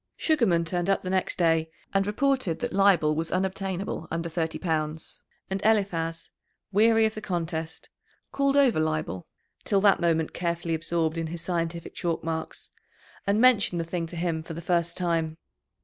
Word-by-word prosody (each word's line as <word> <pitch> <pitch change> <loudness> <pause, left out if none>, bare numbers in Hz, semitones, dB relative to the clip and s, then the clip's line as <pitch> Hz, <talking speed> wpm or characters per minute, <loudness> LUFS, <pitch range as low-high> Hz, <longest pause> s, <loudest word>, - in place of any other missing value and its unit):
Sugarman 225 - +2
turned 175 +2 -1
up 195 - +2
the 185 - -3
next 190 -1 0
day, 165 -2 +2 0.2
and 195 0 +2
reported 255 - +1
that - - -4
Leibel 190 -6 +4
was 160 +1 -2
unobtainable 190 -2 -2
under 165 +1 -3
thirty 165 -1 -2
pounds, 160 -2 -3 0.3
and 190 0 -3
Eliphaz, 180 -7 0 0.4
weary 225 +2 +5
of 220 - 0
the 215 - -7
contest, 165 -4 -4 0.4
called 275 0 +2
over 260 - +4
Leibel, 155 - -2 0.4
till 200 - +2
that 200 -1 +4
moment 160 -2 +1
carefully 170 -1 -2
absorbed 165 0 -1
in 165 - -2
his 165 0 -6
scientific 170 -1 -3
chalk 170 -2 -2
marks, 160 0 -4 0.6
and 200 +2 +3
mentioned 225 -8 +4
the 165 - -2
thing 165 0 -3
to 175 - -8
him 165 -1 -1
for 160 0 -8
the - - -5
first 170 0 0
time. 165 -3 0
170 Hz, 165 wpm, -27 LUFS, 165-195 Hz, 0.6 s, weary